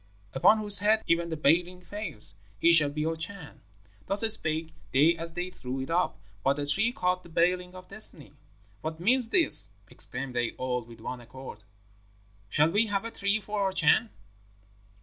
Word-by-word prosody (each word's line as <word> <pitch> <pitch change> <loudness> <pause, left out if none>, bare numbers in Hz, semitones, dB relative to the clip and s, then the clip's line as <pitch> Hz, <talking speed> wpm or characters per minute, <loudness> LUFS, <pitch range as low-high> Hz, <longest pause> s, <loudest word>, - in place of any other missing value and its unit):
'Upon 170 +11 +4
whose 205 -2 +7
head 215 +2 +2
even 170 0 0
the 160 - -4
Baling 175 +5 +1
falls, 175 - -8 0.3
he 170 - +4
shall 155 -3 +4
be 150 +2 -4
our 165 0 -2
Chan.' 165 0 -6 0.5
Thus 195 +1 0
spake 160 -3 -3 0.2
they 150 +6 +3
as 165 0 -3
they 175 +2 -5
threw 130 -4 -6
it 130 +4 -6
up; 175 +2 0 0.3
but 135 - +2
the 145 0 -4
tree 200 +11 0
caught 180 -5 -1
the 170 - -16
Baling 180 +2 -1
of 185 0 -12
Destiny. 165 - 0 0.5
'What 160 +1 -6
means 235 +6 +3
this?' 275 - +6 0.2
exclaimed 125 0 -4
they 120 -1 -2
all 125 -1 -3
with 115 0 -15
one 125 +2 -7
accord. 120 -3 -12 0.9
'Shall 150 +9 +2
we 215 +5 +1
have 205 +1 -2
a 230 - -6
tree 200 +1 0
for 210 0 -5
our 195 -1 0
Chan?' 190 +5 +2
170 Hz, 180 wpm, -27 LUFS, 145-200 Hz, 0.9 s, whose